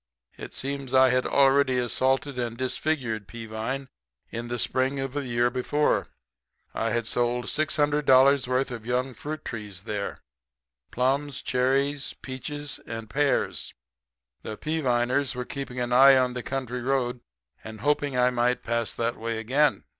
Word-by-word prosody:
It - - -9
seems 135 -1 -3
I 130 0 +7
had 130 0 +2
already 135 -1 +4
assaulted 130 +2 +1
and 120 -1 -3
disfigured 125 -5 -2
Peavine 115 +4 -5 0.4
the 120 +1 -4
spring 130 +4 0
of 135 -1 -3
the 145 -2 -3
year 120 0 +2
before. 140 +4 +1 0.7
I 115 - -1
had 115 0 0
sold 120 +1 0
$600 145 -3 +3
worth 130 +1 0
of 115 -2 -6
young 125 +1 0
fruit 150 +6 -6
trees 105 -5 -6
there 105 -2 -4 0.7
plums, 135 +2 0
cherries, 135 +2 0
peaches 145 +3 -5
and 115 -1 -6
pears. 145 0 0 0.7
The 110 - -6
Peaviners 135 -4 0
were 125 0 -3
keeping 135 -2 -6
an 120 0 -1
eye 135 +2 +8
on 125 -1 +2
the 125 - -4
country 125 -1 -4
road 125 -1 0 0.4
and 110 -1 -9
hoping 145 -1 +1
I 125 0 +4
might 125 0 +1
pass 115 -1 -1
that 115 +1 -1
way 115 0 -3
again. 135 +7 +2
125 Hz, 145 wpm, -26 LUFS, 120-140 Hz, 0.7 s, eye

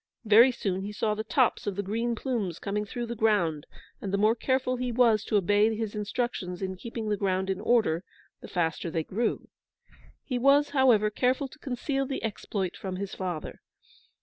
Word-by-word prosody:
Very 225 +4 +7
soon 190 -6 -2
he 200 +2 -5
saw 210 +1 0
the 215 +1 -3
tops 240 0 +1
of 200 - -1
the 200 - -2
green 230 +4 -1
plumes 220 - -2
coming 210 +1 -2
through 240 +3 -4
the 235 0 -5
ground; 200 -9 +1 0.3
and 195 - -4
the 200 - +1
more 215 +2 +4
careful 255 +1 0
he 250 0 -2
was 230 -3 +4
to 215 - +2
obey 205 +3 +3
his 220 -1 -3
instructions 210 -4 -3
in 190 0 -3
keeping 230 +3 -6
the 210 - +1
ground 190 -1 0
in 190 +1 -3
order, 215 -8 +2 0.4
the - - -10
faster 170 -1 -1
they 160 0 -1
grew. 225 +8 -2 0.8
He 250 -3 -2
was, 280 +3 +4
however, 245 -7 +4
careful 255 +5 +1
to 300 - -16
conceal 270 +1 -2
the 270 - -4
exploit 200 -3 -3
from 190 -2 -5
his 195 +1 -5
father. 180 -4 -5
215 Hz, 190 wpm, -28 LUFS, 195-240 Hz, 0.8 s, Very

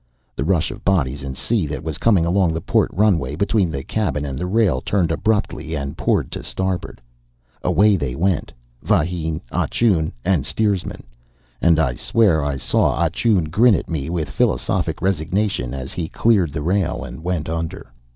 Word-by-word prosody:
The - - -2
rush 85 0 +1
of 105 +2 -10
bodies 75 -8 +1
and 65 -1 -6
sea 110 -9 0
that 75 +1 -5
was 80 -2 -4
coming 100 -8 +3
along 90 -1 +2
the 80 - -2
port - - +1
runway 85 -9 +1
between 100 +1 +1
the 70 -4 -4
cabin 75 -9 -1
and 70 -2 -4
the 90 +7 -3
rail 95 - +2
turned 90 -2 0
abruptly 100 -4 -1
and 70 -2 -4
poured - - 0
to - - -5
starboard. 90 -11 -3 0.6
Away 105 0 +3
they 70 -7 -3
went 90 -1 0 0.3
vahine, 80 -1 0
Ah - - 0
Choon, 90 -10 +1
and 90 -7 +2
steersman; 100 +3 -1 0.6
and 85 -1 +4
I 65 -6 +2
swear 105 - +2
I 70 -1 -1
saw 65 - +1
Ah 85 -1 +1
Choon 90 -4 +1
grin 110 +4 +5
at - - -4
me 75 -2 -2
with 85 -3 -2
philosophic - - 0
resignation 95 - 0
as 65 0 -5
he 85 -3 -3
cleared 100 -9 +2
the 75 +1 -4
rail 90 0 0
and 65 +5 -9
went 85 -3 -2
under. 80 -6 -5
85 Hz, 180 wpm, -21 LUFS, 75-95 Hz, 0.6 s, grin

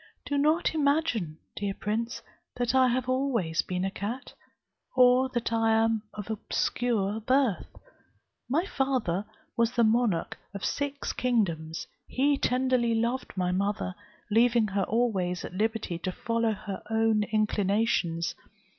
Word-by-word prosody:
"Do 285 - -2
not 310 +4 +2
imagine, 280 - +1 0.2
dear 200 -1 -2
prince, 230 +4 -3 0.3
that 245 0 0
I 260 -1 +5
have 250 +1 0
always 255 -11 +1
been 180 0 -2
a 195 - -1
cat, 225 +7 -5 0.6
or 255 +1 +5
that 240 -2 -2
I 225 -1 +3
am 225 0 +2
of 210 +1 -5
obscure 220 -1 -1
birth. 255 -2 +1 0.8
My 320 +8 +2
father 255 - 0 0.3
was 235 +1 +2
the 235 - +3
monarch 220 -5 +1 0.2
of 200 - -3
six 285 0 -2
kingdoms; 170 -10 0 0.2
he 280 +2 +2
tenderly 250 -3 +1
loved 235 +3 -1
my 180 -1 +1
mother, 195 0 -1 0.4
leaving 230 0 +4
her 195 -1 0
always 195 -6 0
at - - -8
liberty 215 -3 -1
to 185 - -2
follow 230 +3 0
her 195 -1 -6
own 225 -1 +2
inclinations. 205 -5 +1
225 Hz, 135 wpm, -28 LUFS, 200-250 Hz, 0.8 s, I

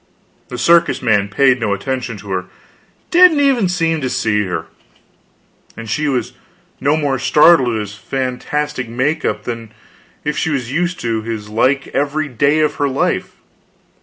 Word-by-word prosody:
The 125 - -7
circus 170 +6 +3
man 105 -4 +2
paid 130 +4 +3
no 105 -4 0
attention 125 +1 -4
to 100 0 -10
her; 90 -1 -2 0.7
didn't 355 -3 +6
even 265 -9 +2
seem 165 -3 0
to 130 - -1
see 105 -4 0
her. 90 -3 -4 1.1
And 115 0 -8
she 110 +8 -2
she 150 - 0
was 125 -5 -1 0.5
no 145 +3 +2
more 140 -4 -1
startled 150 -6 +4
at 110 - -1
his 105 -1 -7
fantastic 130 +3 -3
make 140 +7 -1
up - - -2
than 115 -2 -6 0.5
if 150 0 -2
she - - -1
was 130 -5 -2
used 175 +4 -1
to 115 -2 -1
his 110 -2 -6
like 130 +5 +1
every 145 +2 -1
day 140 +4 +1
of 155 - 0
her 145 -1 +1
life. 130 - -1
130 Hz, 165 wpm, -17 LUFS, 115-150 Hz, 1.1 s, didn't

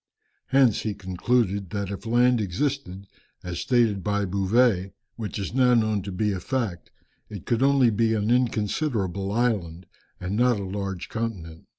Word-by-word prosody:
Hence 130 -3 +4
he 105 -2 -3
concluded 100 +1 0
that 100 +1 -3
if 100 +3 -7
land 120 0 +3
existed 100 -1 -3 0.4
as 85 -1 -5
stated 115 -7 +1
by 105 -1 0
Bouvet 100 0 +1 0.2
(which 110 -2 -5
is 100 +1 -4
now 125 -1 +4
known 110 -3 +1
to 100 +1 -6
be 105 +3 0
a 95 - -3
fact) 105 -6 -3 0.4
it 100 -5 -8
could 115 0 0
only 135 -3 +4
be 110 +1 +1
an 105 +1 0
inconsiderable 105 - 0
island, 100 -7 -1 0.3
and 90 +2 -3
not 120 -1 +3
a - - -4
large 95 -1 -4
continent. 95 -8 -5
105 Hz, 160 wpm, -25 LUFS, 95-120 Hz, 0.4 s, Hence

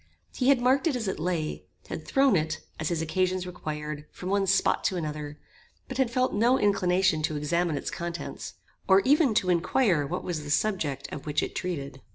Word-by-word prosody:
He 255 - -1
had 275 -3 +5
marked 265 +5 +3
it 295 - +1
as 230 -4 -2
it 190 - -2
lay; 160 -2 -2 0.2
had - - -6
thrown 270 -5 +4
it, 155 -1 0 0.2
as 155 - -1
his 165 -2 -1
occasions 185 +2 0
required, 150 -4 -6
from 185 - -7
one 200 0 +1
spot 195 +1 +2
to 185 - +1
another; 150 -2 -5 0.5
but 260 0 -6
had 260 -3 +3
felt 255 +2 +1
no 235 +5 +3
inclination 185 -5 +2
to 155 0 -1
examine 160 +2 0
its - - -4
contents, 170 0 -6 0.3
or 190 0 +6
even 275 -2 +3
to 185 -3 +2
inquire 175 - +2
what 180 +5 -3
was 165 -4 -3
the 145 - -8
subject 155 -5 0
of 145 - -7
which 150 -1 +1
it - - -4
treated. 140 -7 -4
180 Hz, 200 wpm, -27 LUFS, 155-210 Hz, 0.5 s, or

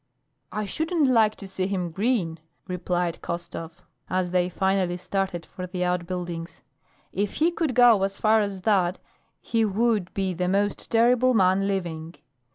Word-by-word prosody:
"I 215 0 -2
shouldn't 320 - 0
like 225 -4 +4
to 195 - -9
see 190 -1 -2
him 185 -3 -2
grin," 190 -5 0 0.3
replied 180 -2 -2
Khostov, 170 -1 -6 0.3
as 185 -1 0
they 180 0 +2
finally 190 -1 0
started 190 -2 -2
for 185 0 -7
the 180 0 -2
outbuildings. 175 -1 -3 0.5
"If 205 0 -2
he 330 +3 +3
could 320 -7 -1
go 240 -5 +6
as 195 0 -1
far 220 0 +4
as 200 -2 -3
that 185 -3 +2 0.4
he 230 -1 0
would 215 -2 +1
be 190 -2 0
the 180 +1 -1
most 200 +2 0
terrible 245 +2 +4
man 190 0 +3
living. 170 -5 -3
190 Hz, 155 wpm, -25 LUFS, 180-215 Hz, 0.5 s, go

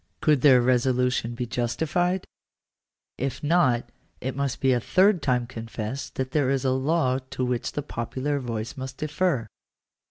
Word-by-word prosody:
Could 150 -4 +3
their 130 -4 +6
resolution 125 -1 +1
be 125 0 -3
justified? 160 +10 -1 0.9
If 135 +3 -3
not 130 -7 +2 0.3
it 130 0 -4
must 140 -2 -2
be 130 -1 +3
a 125 - +2
third 185 - +3
time 125 -4 +1
confessed 115 +1 -6
that 130 0 -2
there 145 -4 +2
is 135 -1 0
a 130 - +3
law 130 -1 +1
to 130 - -2
which 125 -1 -2
the 145 - -3
popular 135 +3 -2
voice 115 -3 -4
must 130 0 -7
defer. 155 -4 0
130 Hz, 155 wpm, -25 LUFS, 120-145 Hz, 0.9 s, their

